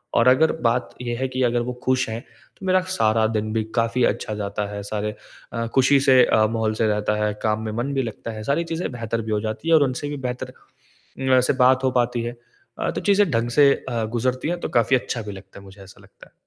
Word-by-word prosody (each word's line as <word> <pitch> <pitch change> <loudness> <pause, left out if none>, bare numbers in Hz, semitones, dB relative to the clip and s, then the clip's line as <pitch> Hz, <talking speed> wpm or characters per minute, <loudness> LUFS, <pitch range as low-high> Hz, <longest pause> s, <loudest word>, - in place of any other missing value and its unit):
और 115 - +4
अगर 150 +5 +4
बात 120 +1 +1
ये 120 -1 -3
है 130 - -1
कि 130 0 -3
अगर 120 0 +2
वो 125 +1 -3
खुश 130 0 +1
हैं, 110 +1 -4 0.4
तो 195 - -8
मेरा 185 0 +4 0.2
सारा 110 0 +3
दिन 110 -1 -2
भी 110 -1 0
काफ़ी 115 +1 +1
अच्छा 110 - -2
जाता 105 0 -3
है, 100 - -5
सारे 105 +1 -3 0.4
अ, 115 0 -2
खुशी 135 +1 +5
से 130 -2 +6
अ, 110 - +3
माहौल 110 -1 -1
से 110 - +3
रहता 105 0 0
है, 105 - 0
काम 110 0 +1
में 110 - -3
मन 125 +5 -2
भी 135 - +1
लगता 115 0 -6
है। 110 -1 -7
सारी 140 +8 0
चीज़ें 165 -2 -3
बेहतर 115 -1 -3
भी 110 0 -5
हो 105 - +1
जाती 110 +9 -4
है - - +5
और 155 - +5
उनसे 135 +2 -2
भी 145 - -4
बेहतर 125 +1 -5 0.8
वैसे 130 -1 +4
बात 130 +1 +4
हो 130 - +3
पाती 120 -1 0
है। 120 +1 -5 0.4
अ, - - -1
तो - - -4
चीज़ें 200 -3 +3
ढंग 115 0 0
से 140 -1 +7 0.2
अ, 115 -3 -1
गुज़रती 125 +5 -1
है 175 - 0
तो - - -3
काफ़ी 120 +3 +3
अच्छा 120 -1 -3
भी 105 -1 -7
लगता 95 0 -12
है - - -15
मुझे 95 0 -14
ऐसा 95 - -16
लगता - - -18
है। - - -36
120 Hz, 250 wpm, -23 LUFS, 110-130 Hz, 0.8 s, से